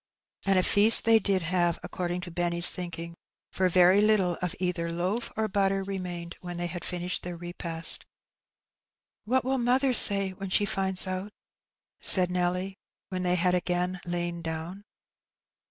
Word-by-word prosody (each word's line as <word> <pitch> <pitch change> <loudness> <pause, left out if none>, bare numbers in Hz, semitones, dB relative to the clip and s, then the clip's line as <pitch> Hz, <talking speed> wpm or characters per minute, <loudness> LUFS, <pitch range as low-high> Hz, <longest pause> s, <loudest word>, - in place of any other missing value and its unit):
'' - - -28
And 195 -1 +2
a 185 - +2
feast 210 +4 +5
they 225 -1 +5
did 195 -3 -2
have, 175 0 -1
according 180 -1 -5
to 175 -1 -9
Benny's 170 0 +6
thinking, 170 -1 -7 0.4
for 185 -1 -1
very 180 +3 +4
little 205 -5 +1
of 180 -2 -4
either 180 -2 -3
loaf 185 +8 -4
or 220 0 -1
batter 195 -1 -1
remained 180 -3 -7
when 175 -1 -8
"they 175 - -3
had 175 0 -6
finished 180 0 -3
their 175 -1 -8
repast. 170 -1 -3 0.6
" - - -65
What 255 +4 0
will 265 0 -1
mother 255 +2 +1
say 195 -4 +7
when 195 +1 -8
she 205 +2 +1
finds 190 -1 -2
out? 185 +2 -5 0.4
" - - -68 0.3
said 180 -2 +6
Nelly, 180 +2 -3 0.3
when 185 -1 -4
they 180 0 +1
had 180 0 0
again 180 0 -2
lain 175 -1 -5
down. 165 +5 -7
180 Hz, 170 wpm, -26 LUFS, 175-195 Hz, 0.6 s, say